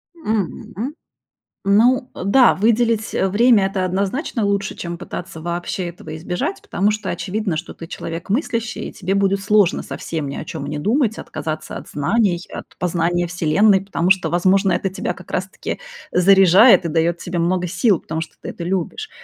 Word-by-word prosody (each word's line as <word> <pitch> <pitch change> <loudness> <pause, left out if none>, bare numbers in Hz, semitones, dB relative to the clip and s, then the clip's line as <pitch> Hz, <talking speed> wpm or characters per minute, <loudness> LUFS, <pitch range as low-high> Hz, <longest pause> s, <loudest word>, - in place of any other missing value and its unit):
Мгм. 225 - -3 0.7
Ну, 245 +5 +4
э, - - -8
да, 245 +5 +6
выделить, 225 +1 +1
э, 190 - +2
время- 215 +1 +4
это 190 -1 -1
однозначно 200 - -1
лучше, 200 0 -1
чем 170 0 -6
пытаться 175 -2 -7
вообще 175 +2 -3
этого 160 -2 -9
избежать, 180 - -3
потому 200 +3 0
что 215 -3 -3
очевидно, 185 0 -2
что 170 - -6
ты 165 - -10
человек 165 +2 -6
мыслящий, 230 0 -2
и - - -14
тебе 190 -1 -2
будет 195 0 +1
сложно 205 -2 +3
совсем 160 -3 -5
ни 140 - -5
о - - -6
чём 150 -3 -6
не 150 +1 -3
думать, 220 - +1
отказаться 155 0 -5
от - - -11
знаний, 175 +5 +1
от - - -6
познания 175 0 0
Вселенной. 180 +4 +3
Потому 190 -2 0
что, 185 -4 +3
возможно, 185 +3 +3
это 195 - 0
тебя 190 - -3
как - - -13
раз-таки - - -4 0.3
заряжает 190 +3 +6
и - - +1
даёт 165 +2 +1
тебе 175 0 -4
много 180 +1 +1
сил, 185 +2 +2
потому 160 0 -4
что 160 - -8
ты - - -7
это 170 - -7
любишь. 190 - -3
190 Hz, 175 wpm, -20 LUFS, 170-210 Hz, 0.7 s, да